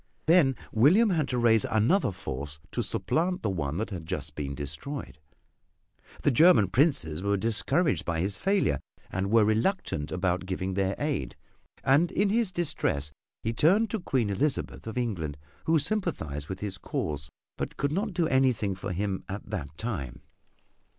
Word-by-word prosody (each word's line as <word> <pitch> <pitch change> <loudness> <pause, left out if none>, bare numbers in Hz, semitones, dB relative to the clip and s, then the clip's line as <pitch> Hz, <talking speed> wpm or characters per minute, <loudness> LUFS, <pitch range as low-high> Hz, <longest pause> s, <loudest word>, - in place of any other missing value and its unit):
Then 155 -5 +5 0.2
William 180 - +5
had 155 -5 +1
to 125 - -1
raise 115 -2 +4
another 110 - +2
force 75 -3 -6
to - - -1
supplant 180 +3 0
the 105 - +1
one 80 -4 -2
that 110 +2 -3
had 85 -4 -6
just 75 -5 -3
been 70 -2 -4
destroyed. 75 - -5 1.0
The 145 - +4
German 130 - +6
princes 95 - +2
were 100 +1 +1
discouraged 115 - +1
by 85 -2 -2
his 95 +3 -1
failure 190 - +2 0.3
and 95 +1 -1
were 110 0 +5
reluctant 110 - 0
about 90 0 -1
giving 95 0 -2
their 95 0 0
aid; 145 - -2 0.5
and 145 +6 +4
in 200 +1 +2
his 220 -2 +1
distress 75 - -1 0.3
he 115 - -1
turned 195 - +3
to 220 - -1
Queen 130 - 0
Elizabeth 135 +3 -1
of 110 - -5
England, 90 -12 -2 0.3
who 160 0 +4
sympathized 145 - -2
with 95 0 -5
his 95 -2 -4
cause, 75 -4 -3 0.3
but - - -5
could 140 - 0
not 200 +7 -1
do 170 -2 +2
anything 130 -8 +2
for 90 0 -5
him 95 +1 -2
at 100 +3 -6
that 75 -7 -5
time. 85 - -4
110 Hz, 165 wpm, -28 LUFS, -, 1.0 s, German